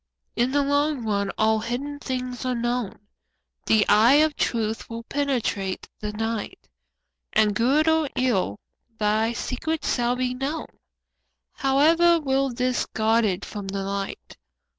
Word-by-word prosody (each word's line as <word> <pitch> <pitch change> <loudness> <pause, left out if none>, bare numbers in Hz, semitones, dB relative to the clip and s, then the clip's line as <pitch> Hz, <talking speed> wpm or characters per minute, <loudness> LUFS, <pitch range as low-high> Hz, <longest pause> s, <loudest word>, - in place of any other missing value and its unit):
In 245 +2 +1
the 285 +1 +2
long 285 -2 0
run 200 -2 0
all 220 0 +3
hidden 275 +6 -4
things 255 -2 -4
are 255 -1 -1
known, 240 -2 -2 0.7
The 220 -2 +4
eye 220 +6 +6
of 305 0 +3
truth 225 -1 -1
will 230 0 -6
penetrate 245 -9 -2
the 210 0 -4
night, 225 0 -4 0.7
And 215 -1 +3
good 270 +8 +2
or 320 -2 +3
ill, 195 - 0 0.4
thy 215 +2 +1
secret 300 +6 -3
shall 245 0 +1
be 250 0 -1
known, 275 +5 -3 0.9
However 330 +5 +4
well 270 -2 0
'tis 250 +1 -1
guarded 220 -3 +1
from 205 -2 -7
the 195 0 -3
light. 195 0 -5
245 Hz, 135 wpm, -24 LUFS, 215-275 Hz, 0.9 s, eye